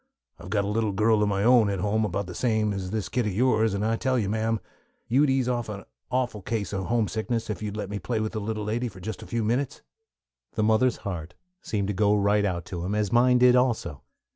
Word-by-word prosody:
I've - - -10
got 100 -1 +1
a - - -3
little 105 0 0
girl 110 +2 +3
of 105 - +2
my 100 0 0
own 120 -3 +5
at 100 - -1
home 105 +3 +1
about 100 0 -2
the 90 - -8
same 110 -1 +1
age 100 - -3
as 95 -1 -5
this 105 -2 -2
kid 115 +4 -1
of 100 - -2
yours, 110 -1 +2
and 100 +2 -1
I 115 +1 +1
tell 130 +1 0
you, 105 -5 0
ma'am, 110 +1 0 0.5
you'd 140 +5 +3
ease 130 -2 +1
off 120 -3 -1
an 100 -1 -6 0.3
awful 125 -5 -1
case 105 0 -3
of 95 -1 -2
homesickness 115 0 -1
if 100 - -5
you'd 105 -1 -4
let 100 -2 -4
me 100 - -3
play 110 +4 -2
with 110 0 -2
the 110 - -4
little 105 0 -3
lady 115 +4 -1
just 95 +1 -7
for - - -9
a - - -13
few 115 -1 -1
minutes." 130 +6 -1 0.7
The 110 - 0
mother's 110 +3 +3
heart 90 -3 -5 0.3
seemed 100 -3 -2
to - - 0
go 105 +1 +3
right 105 0 +2
out 90 -3 -2
to 85 -2 -5
him, 100 +4 -2
as 105 -2 0
did - - -6
mine 125 +1 +5
also. 115 - 0
110 Hz, 250 wpm, -26 LUFS, 100-115 Hz, 0.7 s, own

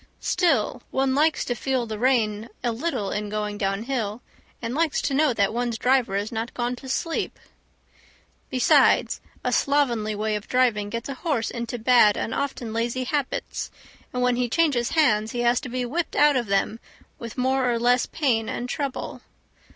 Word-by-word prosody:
Still, 270 - +1
one 265 0 +1
likes 310 +3 +2
to 245 - -1
feel 255 0 -1
the 215 -2 -5
rein 225 -3 +1
a 240 - +1
little 240 -5 -2
in 210 0 -3
going 210 0 -3
downhill, 215 +2 -2 0.4
and 230 0 -4
likes 315 +1 +1
to 275 - 0
know 295 0 +3
that 205 -3 +1
one's 240 -1 -1
driver 250 -6 +2
is 205 +3 -2
not 225 0 -4
gone 245 0 -1
to 265 +1 -10
sleep. 330 +5 -2 1.1
Besides, 255 -2 +3 0.2
a - - 0
slovenly 240 -7 +1
way 215 +1 -1
of 210 - -5
driving 235 -5 +2
gets 230 +1 -4
a 275 - -4
horse 265 -4 -1
into 235 0 -4
bad 230 -3 +5
and - - -2
often 250 -5 -3
lazy 235 +3 -1
habits, 280 +1 -2 0.4
and 250 0 -1
when 250 -1 +2
he 245 -1 0
changes 270 -5 +2
hands 220 -8 +3
he 240 - -1
has 240 0 +3
to 265 - -6
be 250 +1 -2
whipped 325 +8 -2
out 295 -1 +5
of 240 -3 0
them 200 +3 0 0.4
with 230 +1 -8
more 260 0 +1
or 235 - +1
less 245 +1 +3
pain 240 -8 0
and 245 - -3
trouble. 275 0 -4
245 Hz, 180 wpm, -24 LUFS, 220-265 Hz, 1.1 s, bad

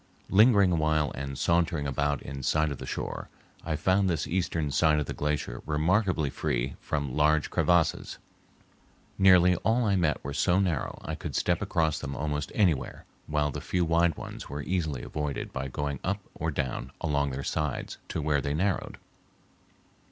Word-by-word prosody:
Lingering 100 -2 +6
a - - +2
while 80 -1 +1
and 70 0 -5
sauntering 85 -3 +1
about 70 +1 -1
in 70 0 -6
sight 75 +3 +1
of 70 - -5
the - - -7
shore, - - -4 0.3
I 80 -1 -1
found 95 +5 +2
this 80 -4 0
eastern 80 -4 -1
side 75 0 +3
of 75 - -1
the - - -4
glacier 75 -5 -2
remarkably 80 0 +1
free 60 +2 -2
from 70 -4 -3
large 75 0 +2
crevasses. 85 -2 +1 1.0
Nearly 90 -2 +6
all 115 +5 +1
I 100 -2 +2
met 85 -5 +1
were 70 - -4
so 90 +6 +2
narrow 90 -8 -1
I - - -3
could - - -6
step 90 -1 +1
across 80 -6 0
them 70 -1 -5
almost 75 0 -2
anywhere, 80 - +1 0.2
while 75 -1 0
the - - -5
few 90 -1 0
wide 85 0 +2
ones - - -8
were 70 +1 -4
easily 80 -7 -2
avoided 75 -2 -4
by 65 0 -3
going 70 +1 -3
up 100 +2 -1
or 80 - -3
down 65 -4 -3
along 70 -1 0
their 65 +1 -4
sides 75 -4 -3
to 80 - -3
where 75 -2 +2
they 70 0 -2
narrowed. 95 +3 -1
75 Hz, 175 wpm, -28 LUFS, 70-90 Hz, 1.0 s, Lingering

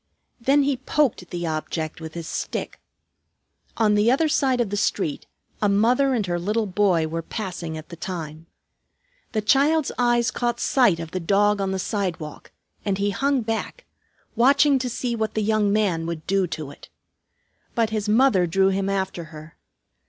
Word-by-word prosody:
Then 275 +4 +3
he 275 -1 0
poked 260 - 0
the 175 -1 -4
object 155 0 -3
with 160 0 -8
his 165 -1 -6
stick. - - -4 1.0
On 215 -2 +3
the 210 +2 +3
other 280 +6 +3
side 265 -4 +1
of 230 -5 0
the - - -1
street 195 -6 -1 0.3
a 210 - +3
mother 245 +7 +3
and 215 -4 0
her 175 -1 -1
little 210 +5 0
boy 190 -4 +2
were 165 +1 -3
passing 170 -4 -5
at 155 0 -10
the - - -8
time. 165 -2 -6 0.9
The 215 -2 0
child's 280 +7 +3
eyes 240 0 +2
caught 240 -1 -1
sight 225 -11 +3
of 165 -1 -6
the 185 - -2
dog 205 +3 +2
on 195 - -1
the 190 - -1
sidewalk, 180 -6 -4 0.3
and 200 -2 -1
he 205 +1 0
hung 275 +4 +1
back, 225 - -4 0.5
watching 275 +3 +4
to 255 0 -2
see 240 0 -2
what 220 -1 -2
the 215 - 0
young 215 -1 +2
man 190 -6 +1
would 165 -2 -5
do 195 -1 +1
to 155 -4 -6
it. - - -15 0.9
But 225 -2 +1
his 215 -1 -2
mother 215 -6 +4
drew 190 +3 +3
him 195 0 -1
after 190 -3 -2
her. 155 -1 -12
205 Hz, 175 wpm, -23 LUFS, 170-240 Hz, 1.0 s, watching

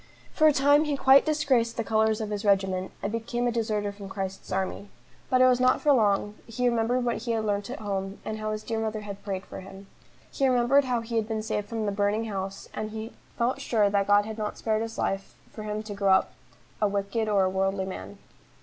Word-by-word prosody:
For 310 - +5
a - - +7
time 285 +2 +4
he 290 -2 -1
quite 270 +2 +6
disgraced 265 -7 +1
the 230 - 0
colours 220 +1 +1
of 215 -1 -4
his 205 0 -3
regiment, 190 -2 +1
and 200 - -1
became 240 +2 -2
a 240 - +2
deserter 215 -3 -1
from 200 -1 -10
Christ's 190 -1 -5
army. 190 +2 -2 0.4
But 255 0 +3
it 255 - +7
was 250 -1 +4
not 255 0 +4
for 295 - +4
long, 205 -3 +2
he 245 +2 0
remembered 240 +1 +1
what 235 - 0
he 235 +1 -2
had 220 -1 -1
learnt 205 0 -1
at 260 - -5
home, 195 -1 -3
and 220 0 -4
how 215 0 -2
his 215 0 -4
dear 225 -1 -2
mother 220 -1 -2
had 200 -1 -8
prayed 195 -2 -4
for - - -8
him. 195 +1 -11 0.5
He 270 - +1
remembered 255 +2 +4
how 245 -2 0
he 230 0 -3
had 220 -1 0
been 220 -1 -2
saved 210 -2 -3
from 225 -2 -2
the 205 - 0
burning 205 +2 0
house, 195 -2 -5
and 215 0 -4
he 220 +2 -7 0.2
felt 250 +3 0
sure 210 -6 +2
that 200 -1 +1
God 205 0 +5
had 220 0 -6
not 210 -1 -3
spared 220 -1 0
his 225 0 -5
life 195 0 -2 0.2
for 215 - -8
him 210 0 -4
to 215 -1 -6
grow 200 -1 +3
up 190 - +2 0.5
a 210 - +4
wicked 200 +2 -1
or 200 -2 +3
a 185 - +2
worldly 190 0 0
man. 190 +1 -7
215 Hz, 240 wpm, -27 LUFS, 200-235 Hz, 0.5 s, a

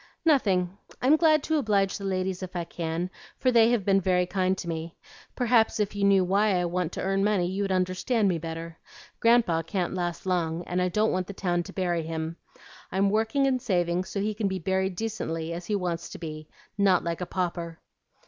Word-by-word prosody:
"Nothing. 195 - +2 0.2
I'm 270 +5 +5
glad 315 -2 +4
to 315 -1 +1
oblige 200 -6 +1
the 200 - -6
ladies 185 -1 -1
if 185 0 -7
I 175 - -1
can, 165 +2 -3 0.3
for 255 - +2
they 230 -1 +6
have 235 -5 +1
been 195 -1 +4
very 180 -1 +2
kind 185 0 0
to 175 - -6
me. 165 0 -4 0.4
Perhaps 235 -3 +3
if 210 -1 0
you 205 - -1
knew 195 -1 +5
why 195 +1 +2
I 175 - 0
want 175 -1 -1
to - - -4
earn 195 +1 +1
money, 205 -4 +2
you'd 195 +2 -2
understand 185 +5 +1
me 175 -3 +1
better. 165 0 -6 0.4
Grandpa 230 -8 +4
can't 175 +2 -2
last 175 -2 -3
long, 170 -2 0
and 180 +1 -1
I 180 - +1
don't 215 +4 +2
want 185 0 -1
the 200 - -6
town 175 -2 0
to - - -9
bury 175 -3 0
him. 160 0 -4 0.6
I'm 195 +1 +2
working 220 +6 +2
and 260 -2 +1
saving 175 -4 0
so 200 - -4
he 215 +1 -1
can 210 -1 -1
be 190 -1 -2
buried 190 +1 -1
decently, 170 -7 -3
as 170 +1 -6
he 210 - 0
wants 175 -3 -2
to - - -8
be, 155 -2 -7 0.3
not 190 -3 +4
like 170 +1 -3
a 180 - -3
pauper." 170 -2 -3
185 Hz, 210 wpm, -27 LUFS, 175-205 Hz, 0.6 s, they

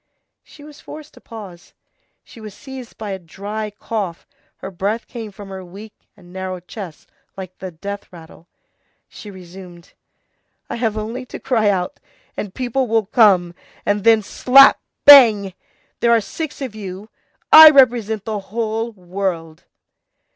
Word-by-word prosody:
She 290 - -18
was 300 0 -14
forced 305 0 -12
to - - -18
pause; 195 -7 -12 0.5
she 230 - -16
was 210 -2 -10
seized 265 -3 -11
by 215 -2 -6
a 190 - -5
dry 205 +5 -7
cough, 205 -4 -6 0.3
her - - -9
breath 200 +5 -3
came 225 -4 -9
from 200 0 -12
her 190 -1 -8
weak 200 +4 -12 0.2
and 180 -2 -18
narrow 185 -1 -5
chest 180 -2 -11 0.3
like 185 -1 -10
the 190 - -6
death 200 +4 -8
rattle. 165 -1 -15 0.6
She 210 - -12
resumed:— 180 -2 -13 0.8
"I - - -4
have 225 -2 -2
only 225 +4 -5
to - - -9
cry 225 -5 0
out, 180 -3 -2 0.4
and 205 - -6
people 255 +4 -2
will 225 -1 0
come, 190 -5 +3 0.3
and 205 -1 -1
then 225 -1 +4
slap, 270 +7 +5 0.3
bang! 220 -9 +8 0.5
There 235 - +1
are 230 - +5
six 285 +8 -7
of 255 -5 -6
you; 200 0 -9 0.4
I 315 0 +12
represent 235 -7 +2
the 215 -2 -3
whole 225 +3 -4
world." 180 -4 -5
210 Hz, 150 wpm, -19 LUFS, 185-230 Hz, 0.8 s, I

